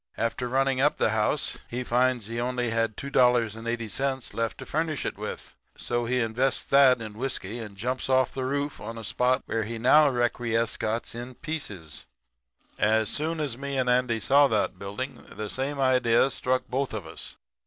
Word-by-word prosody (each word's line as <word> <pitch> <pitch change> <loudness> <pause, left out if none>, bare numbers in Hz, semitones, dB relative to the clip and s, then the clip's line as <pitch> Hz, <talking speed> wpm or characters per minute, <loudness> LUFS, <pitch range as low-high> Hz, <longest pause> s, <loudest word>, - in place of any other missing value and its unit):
After 115 +2 -1
running 135 0 +2
up 145 +2 +3
the - - +2
house 110 +6 +1
he 125 +1 -3
finds 125 -1 +1
he 115 +2 -4
only 125 -1 -1
had 115 -2 0
$2.80 120 0 0
left 115 -1 -2
to - - -8
furnish 155 -2 -1
it - - -2
with, - - -7 0.2
so 120 0 -1
he 125 +2 +1
invests 115 +3 0
that 135 -3 +5
in 110 -2 -7
whiskey 120 -2 -4
and 105 -3 -8
jumps 125 +6 -2
off 130 0 +3
the 130 - -3
roof 140 +2 -2
on 115 +2 -6
a 115 - -7
spot 125 +5 +1
where 115 - -1
he 115 +2 -5
now 145 +6 +6
requiescats 115 -2 0
in 120 +2 -7
pieces. 100 - -5 0.7
"As 110 +1 +3
soon 160 +2 -1
as 135 -5 -3
me 140 0 -3
and 130 -1 +1
Andy 125 -2 +2
saw 140 +6 +5
that 105 -5 0
building 115 +8 -5
the 105 -1 -3
same 140 +2 -2
idea 130 -1 +3
struck 130 +1 0
both 130 -2 -2
of 100 -6 -5
us. 80 - -4
125 Hz, 175 wpm, -27 LUFS, 115-135 Hz, 0.7 s, now